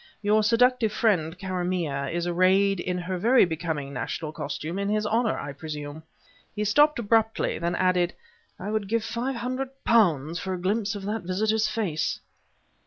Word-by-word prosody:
Your 210 +1 +4
seductive 235 +1 +3
friend, 180 -8 +1
Karamaneh, 180 -7 -2
is 170 0 -2
arrayed 185 +2 +3
in 180 +1 -2
her 180 +1 -3
very 240 +5 +5
becoming 160 -4 -3
national 150 +5 -4
costume 155 +4 -4
in 200 0 -1
his 215 0 0
honor, 225 +2 +1
I 140 - -5
presume." 150 0 -7 0.5
He 210 - -1
stopped 295 +9 +4
abruptly; 225 -1 +1
then 170 +1 -1
added: 180 -1 +1 0.4
"I 200 +3 -4
would 215 -2 -1
give 230 +2 0
five 245 +4 -2
hundred 255 +3 -3
pounds 170 -8 +3
for 190 -1 -3
a - - -6
glimpse 205 +3 0
of 200 -1 -6
that 215 +2 -2
visitor's 215 +4 +1
face!" 180 -10 -1
190 Hz, 165 wpm, -26 LUFS, 170-220 Hz, 0.5 s, very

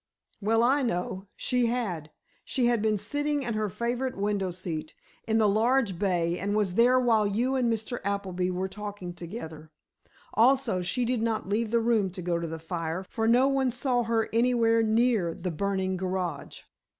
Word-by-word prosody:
"Well, 225 +3 +2
I 270 +4 +3
know. 190 -4 -2
She 250 -1 +1
had. 195 -11 -2 0.3
She 255 - 0
had 240 -2 +2
been 215 -1 +2
sitting 290 +7 -1
in 235 -2 -2
her 215 -1 -1
favorite 245 +5 -2
window 200 -1 0
seat, 170 -3 -5 0.3
in 220 0 +2
the 220 -1 +4
large 220 -2 +2
bay, 175 -3 0
and 205 +1 -1
was 205 -4 +1
there 245 +5 +5
while 225 -4 +3
you 235 +6 0
and 245 -3 +2
Mr. 225 +2 -3
Appleby 190 -2 -1
were 185 +1 -2
talking 200 -2 -7
together. 165 -3 -8 0.6
Also, 240 -4 +3
she 240 +8 0
did 245 -1 0
not 220 -4 -1
leave 220 +2 0
the 235 +1 +2
room 225 -4 +2
to 185 -2 -6
go 170 -1 0
to 170 - -3
the 165 0 -5
fire, 165 +2 -4
for 225 -1 0
no 245 +3 +5
one 270 -1 +2
saw 250 0 0
her 225 -1 0
anywhere 230 -1 +3
near 220 -6 +2
the 180 - -4
burning 190 +2 -1
garage." 180 -5 -4
215 Hz, 180 wpm, -28 LUFS, 185-240 Hz, 0.6 s, there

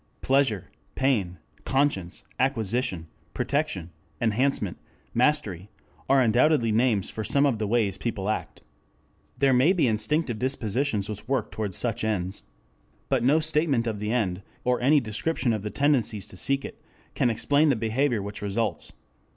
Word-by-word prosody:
Pleasure, 130 -8 +1 0.2
pain, 105 -10 +1 0.3
conscience, 135 -11 0 0.2
acquisition, 115 -8 0 0.3
protection, 140 - -1 0.3
enhancement, 115 -4 0 0.4
mastery, 115 - +1 0.4
are 135 0 +5
undoubtedly 120 +1 +3
names 110 -3 +2
for 110 - -4
some 140 +6 +3
of 130 -6 +1
the 105 - -1
ways 105 -4 +1
people 105 -5 -3
act. 110 - -3 0.8
There 135 -1 +3
may 135 +9 +5
be 180 - +2
instinctive 115 +3 0
dispositions 120 -3 -1
which 105 0 -7
work 130 -4 -1
toward 105 -4 -4
such 115 -3 -1
ends. 95 -3 -2 0.7
But - - +2
no 145 +6 +4
statement 150 -6 +1
of 110 -3 -2
the 105 +1 -2
end, 100 -6 0 0.2
or 125 0 +1
any 145 +4 +5
description 120 +3 -1
of 110 - -2
the 105 - -4
tendencies 120 -7 +1
to - - -13
seek 135 +8 0
it, - - -10 0.3
can 125 - +2
explain 145 +7 +2
the 135 - +3
behavior 115 0 0
which 100 +1 -7
results. 100 -3 -2
115 Hz, 150 wpm, -26 LUFS, 105-135 Hz, 0.8 s, are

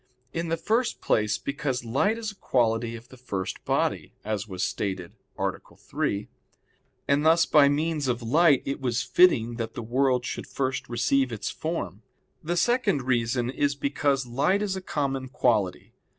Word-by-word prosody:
In 165 +1 -2
the 165 0 0
first 230 +8 0
place 105 -1 +1
because 140 -4 -3
light 170 - +1
is 220 -2 -4
a - - -16
quality 115 - 0
of 115 +1 -12
the 130 - -13
first 100 -7 -4
body, - - -1
as 105 -1 -2
was 95 -2 -4
stated 95 -3 -3 0.2
(A. - - +1 0.3
3), 100 +1 -2 0.8
and 140 +1 +3
thus 165 +1 +5
by 145 -2 +6
means 150 0 0
of 120 -1 -1
light 150 +3 +4
it 140 +1 -3
was 125 -2 0
fitting 120 -10 +4
that 115 -1 -4
the 120 - -4
world 125 +1 +1
should - - -5
first 135 -1 -2
receive 125 +2 +1
its 110 -2 -3
form. 160 - -4 0.4
The 175 +3 -1
second 205 - +2
reason 120 0 0
is 145 +1 0
because 140 -1 0
light 145 - +1
is 195 -2 -1
a 190 - -4
common 135 -6 -2
quality. 115 -9 0
135 Hz, 165 wpm, -26 LUFS, 115-155 Hz, 0.8 s, by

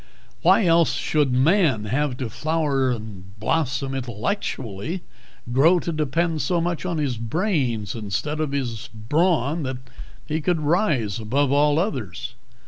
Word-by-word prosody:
Why 220 - +5
else 165 -4 +4
should 135 +2 +1
man 135 - +3
have 130 +3 0
begun 130 - -3
to - - -15
flower 150 -4 +1
and 105 -4 -6
blossom 135 +1 0
intellectually 130 - -3 0.5
grow 160 +8 +5
to 170 - -3
depend 155 +1 0
so 175 -2 +1
much 170 +1 -2
on 170 -2 -1
his 140 -6 -1
brains 120 - -1
instead 115 +8 -3
of 155 -3 -1
his 125 -6 -3
brawn 150 - +1
that 130 -3 -3 0.5
he 155 +1 -2
could 165 +1 +1
rise 145 - +1
above 130 +6 +1
all 145 +1 +4
others? 130 - -3
140 Hz, 140 wpm, -23 LUFS, 120-165 Hz, 0.5 s, Why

